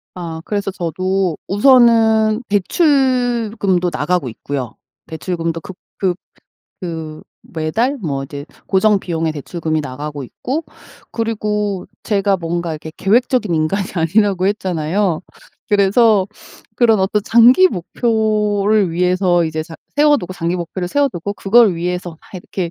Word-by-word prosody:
아. 165 -3 -6
그래서 200 -2 -2
저도 185 0 -1
우선은 220 -1 +4
대출금도 235 - +1
나가고 155 -2 -1
있고요. 125 +1 -5 0.3
대출금도 165 0 -3
급 185 - -10 0.2
급 185 -3 +1 0.7
그 160 -4 -6 0.2
매달 180 - -2
뭐 140 - -3
이제 140 +1 -8 0.2
고정 205 +1 +3
비용의 165 -3 -2
대출금이 155 +1 -3
나가고 145 +1 -6
있고 275 - -4 0.5
그리고 210 -4 -2 0.2
제가 200 -2 +1
뭔가 170 -1 -3
이렇게 155 0 -7
계획적인 235 -1 +2
인간이 165 +5 0
아니라고 185 +2 +1
했잖아요. 185 -2 -1 0.5
그래서 205 0 +4 0.5
그런 225 -4 +4
어떤 205 +2 +1
장기 240 - +6
목표를 210 - 0
위해서 180 0 +2
이제 160 0 -3
장 160 0 -11 0.2
세워두고, 290 - +3
장기 170 0 -2
목표를 175 +1 -4
세워두고 200 - -1
그걸 205 0 +4
위해서 180 +1 -3
막 160 - -15 0.2
이렇게 180 -1 -4
190 Hz, 290 characters per minute, -17 LUFS, 165-215 Hz, 0.7 s, 장기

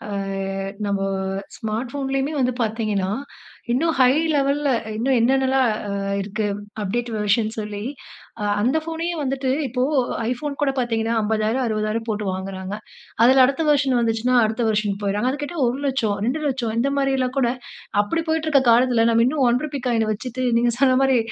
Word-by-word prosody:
ஆ - - -8 0.8
நம்ப 200 -1 -1 0.5
ஸ்மார்ட் 225 +4 -4
போன்லயுமே 270 +1 -1
வந்து 255 0 +2
பாத்தீங்கன்னா, 215 -4 -1 0.6
இன்னும் 320 +6 +1
ஹை 255 0 +6 0.2
லெவல்ல 285 +1 +1 0.3
இன்னும் 255 +3 +1
என்னென்ன 265 +3 +3
எல்லாம் 265 -2 +3 0.2
ஆ - - -3 0.3
இருக்கு 210 +2 -3 0.4
அப்டேட் 240 +5 -2
வெர்ஷன் 215 +1 +1
சொல்லி 210 -1 -4 0.6
அ - - -1 0.2
அந்த 255 +8 +2
ஃபோனயே 330 +1 -3
வந்துட்டு 270 -1 -1 0.2
இப்போ 250 +1 -2 0.5
ஐபோன் 280 +3 -4
கூட 280 - +3
பாத்தீங்கன்னா 230 -2 0
50,000 220 +4 0
60,000 215 0 -1
போட்டு 210 -1 -2
வாங்குறாங்க. 190 +1 -5 0.5
அதுல 260 +2 +7
அடுத்த 275 +4 +1
வெர்ஷன் 275 -4 +3
வந்துச்சுனா 230 +2 +1
அடுத்த 220 +2 -1
வெர்ஷன் 210 -1 -1
போயிறாங்க. 205 +4 0
அத 285 - -5
கேட்டா 345 +3 -7
1,00,000, 255 -5 0
2,00,000 265 -5 -1
இந்த 270 +4 +1
மாரி 275 -1 +1
எல்லாம் 255 0 -1
கூட 240 -3 +2 0.5
அப்படி 325 +11 -1
போயிட்டுருக்க 315 -3 +2
காலத்துல, 235 -1 +4
நம்ம 230 0 +4
இன்னும் 275 -1 +1
1 245 +1 +2
ரூபி 285 -2 -4
காயின 225 -2 +1
வச்சுட்டு. 250 +4 -4
நீங்க 240 0 +2
சொன்ன 260 -2 +5
மாரி 265 -2 +4
245 Hz, 160 wpm, -22 LUFS, 220-270 Hz, 0.8 s, அதுல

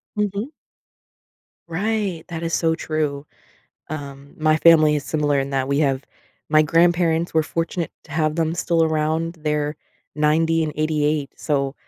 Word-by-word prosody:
Mhm. 210 +3 -2 1.2
Right, 195 -1 -2
that 165 -1 -5
is 165 0 -1
so 165 -1 +2
true. 150 -3 -2 0.6
Um, 140 -2 -7
my 155 0 +3
family 155 -2 +6
is 145 - -4
similar 145 -2 0
in 135 0 -2
that 135 -1 -1
we 140 0 +1
have 135 -3 +1 0.5
my 155 0 +5
grandparents, 170 +1 +2
we're 160 - +4
fortunate 165 +1 -3
to - - -18
have 155 0 +1
them 165 -1 0
still 170 -1 +1
around. 160 +1 0
They're 150 -1 -1 0.4
90 160 +2 +2
and 155 - -3
88, 150 -2 0
so 140 -2 -1
155 Hz, 145 wpm, -22 LUFS, 150-165 Hz, 1.2 s, family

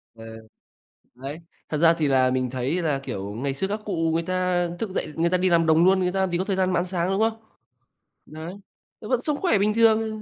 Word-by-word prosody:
Ờ. 115 - -12 0.9
Đấy. 135 +5 -7 0.3
Thật 150 - -1
ra 165 +1 +5
thì 155 -3 -1
là 130 -1 +3
mình 130 -1 -1
thấy 130 +8 -2
là, 150 -4 0
kiểu, 100 -6 -6
ngày 135 +5 -3
xưa 190 +8 -2
các 210 +2 -3
cụ 195 -4 -3 0.2
người 165 0 0
ta 180 -1 0
thức 225 - -3
dậy, 170 -4 -3
người 170 +1 +1
ta 185 - +2
đi 185 +1 +1
làm 165 -1 +3
đồng 160 +2 +4
luôn, 190 0 +4
người 180 -1 0
ta 195 - -2
làm 190 -2 0
gì 170 - 0
có 185 - -1
thời 195 -1 -1
gian 185 -1 +1
mà 170 - +2
ăn 180 - -1
sáng, 180 -1 -2
đúng 195 - 0
không? 225 0 0 0.9
Đấy, 160 +4 -8 0.5
nó 210 - -8
vẫn 250 -2 +1
sống 295 0 0
khỏe 350 - +3
bình 210 +2 +1
thường, 225 -1 +4
ờ, 220 - -3
175 Hz, 260 wpm, -24 LUFS, 150-195 Hz, 0.9 s, ra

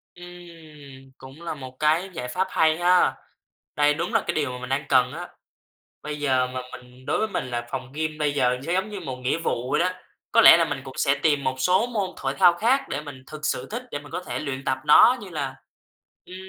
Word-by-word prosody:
Ừm, 160 -7 -13
cũng 135 +5 -13
là 170 - -4
một 130 -3 -10
cái 160 +5 +2
giải 125 -6 -5
pháp 185 +10 -1
hay 160 0 +2
ha. 180 +1 +3 0.6
Đây 145 0 +3
đúng 170 +8 -3
là 225 - +4
cái - - -1
điều 145 -4 -1
mà 125 - -6
mình 125 0 -7
đang 135 +3 -1
cần 125 -1 +3
á. 175 +2 -7 0.7
Bây 150 0 -6
giờ 130 -3 +1
mà 130 0 -5
mình 125 +1 -13
đối - - 0
với 220 - 0
mình 165 -10 -3
là 120 0 -4
phòng 130 -1 -5
gym 155 0 -3
bây 150 -2 0
giờ 125 -3 +1
sẽ 170 - -1
giống 190 +3 0
như 205 -2 -6
một 135 -7 -6
nghĩa 125 +5 -1
vụ 130 -6 -3
vậy - - +2
đó. 180 +2 +2 0.4
Có - - +6
lẽ - - +10
là - - +3
mình - - -4
cũng - - -11
sẽ - - +2
tìm 145 -3 +1
một 130 -1 -1
số 185 - +2
môn 205 -6 -2
thoải 135 0 -3
thao 175 - +6
khác 235 +10 +2
để 140 - -3
mình 140 -3 -10
thực 155 0 -7
sự 125 - -2
thích 240 +3 -4
để 145 - -3
mình 145 0 -14
có - - -3
thể - - -4
luyện 135 -2 -5
tập 130 - 0
nó 240 +11 +7
như 200 - -9
là, 140 -5 -4 0.7
ừm, 180 - -11
150 Hz, 245 wpm, -24 LUFS, 130-175 Hz, 0.7 s, lẽ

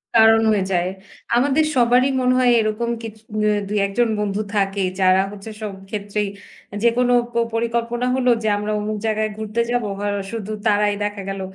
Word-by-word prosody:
কারণ 225 0 +6
হয়ে 205 -3 +2
যায়। 180 0 +1 0.5
আমাদের 285 +5 +3
সবারই 250 +1 +4
মনে 250 0 +3
হয় 250 -1 +4
এরকম 220 +2 -1
কিছু 220 -1 -8 0.2
মে 210 - +3 0.2
২, 210 - -2
১ 195 - -4
জন 240 - +4
বন্ধু 205 0 -1
থাকেই। 195 -2 0
যারা 185 0 +5
হচ্ছে 205 +2 -9
সব 210 -2 -3 0.2
ক্ষেত্রেই 205 0 -2 0.6
যেকোনো 245 +1 +3 0.2
প - - -21 0.2
পরিকল্পনা 235 +1 -1
হলো 255 -1 +3
যে - - 0
আমরা 210 +1 -3
অমুক 210 +1 -3
জায়গায় 215 0 0
ঘুরতে 220 +1 -2
যাব। 245 -1 0 0.2
হ - - -6 0.3
শুধু 215 -2 -5
তারাই 210 -1 +3
দেখা 205 -1 -3
গেল 195 0 -4
215 Hz, 175 wpm, -21 LUFS, 205-235 Hz, 0.6 s, কারণ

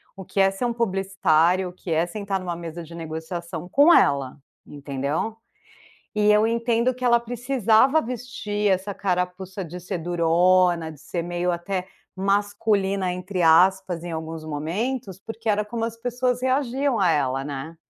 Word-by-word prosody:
o 195 - -8
que 195 - -4
é 195 0 +5
ser 195 +5 -3
um 240 - 0
publicitário, 190 -4 +2
o - - -13
que 180 -1 -8
é 160 +2 +2
sentar 200 +1 -3
numa 175 -2 -4
mesa 170 0 -7
de 165 +1 -12
negociação 165 +1 -6
com 290 - +6
ela, 140 -1 +3 0.3
entendeu. 145 +8 -3 0.8
E 210 0 +3
eu 210 +1 +4
entendo 235 +2 +1
que 255 - -10
ela 235 -1 +5
precisava 245 +3 +2
vestir 225 -4 -3
essa 190 +2 -1
carapuça 185 0 -2
de 175 +2 -8
ser 180 +1 -4
durona, 175 0 +2
de 150 - -14
ser 170 +2 -4
meio 175 +1 -1
até 180 +2 -3 0.3
"masculina", 200 -1 0
entre 180 +1 -3
aspas, 180 +2 +4
em 175 0 -6
alguns 160 0 -6
momentos, 190 - -3
porque 225 +1 -5
era 210 0 +1
como 225 +1 -4
as 230 0 -3
pessoas 250 +1 -1
reagiam 260 0 +1
a 180 -3 +4
ela, 135 -2 0
né? 145 +3 -6
190 Hz, 160 wpm, -24 LUFS, 170-225 Hz, 0.8 s, com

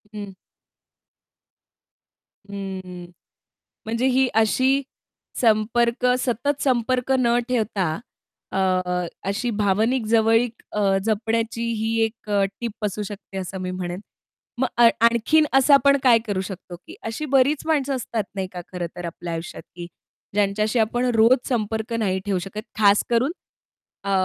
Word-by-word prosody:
हं. 200 -2 -7 2.2
हं. 185 -3 -7 0.7
म्हणजे 230 +3 -1
ही 265 0 +3
अशी 260 +5 +2 0.6
संपर्क 235 +2 +2
सतत 265 +4 -1
संपर्क 255 0 +1
न 240 -1 +3
ठेवता 200 -9 0 0.5
अ, - - -3 0.7
अशी 240 +5 -1
भावनिक 215 +4 +1
जवळीक 225 +1 +2
अ, 200 -2 +2
जपण्याची 225 +1 -1
ही 225 +1 -1
एक 225 -1 -5
अ, 200 -1 +2 0.2
टिप 225 -2 -4
असू 210 +1 -3
शकते 200 -1 -8
असं 190 0 -5
मी 185 0 -3
म्हणेन. 180 0 -4 0.6
मग 260 - +2
आ 235 - +9 0.2
आणखीन 235 +7 +4
असं 270 +2 +5
आपण 280 0 +6
काय 240 -3 +6
करू 200 -3 -1
शकतो 190 -2 -8
की 335 - -10
अशी 225 +7 -3
बरीच 275 +3 +3
माणसं 285 -4 +1
असतात 235 -3 -2
नाही 190 -1 -2
का 180 - -6
खरं 180 -2 -3
तर 175 - -6
आपल्या 170 0 -6
आयुष्यात 165 +1 -6
की 175 -1 -7 0.5
ज्यांच्याशी 210 +3 +1
आपण 240 +3 +1
रोज 225 +4 +6
संपर्क 220 -1 -2
नाही 200 -5 0
ठेऊ 200 -2 0
शकत, 195 +4 -6 0.2
खास 205 -1 +5
करून 245 +6 +2 0.7
अ, 200 - -2
220 Hz, 135 wpm, -23 LUFS, 195-245 Hz, 2.2 s, आ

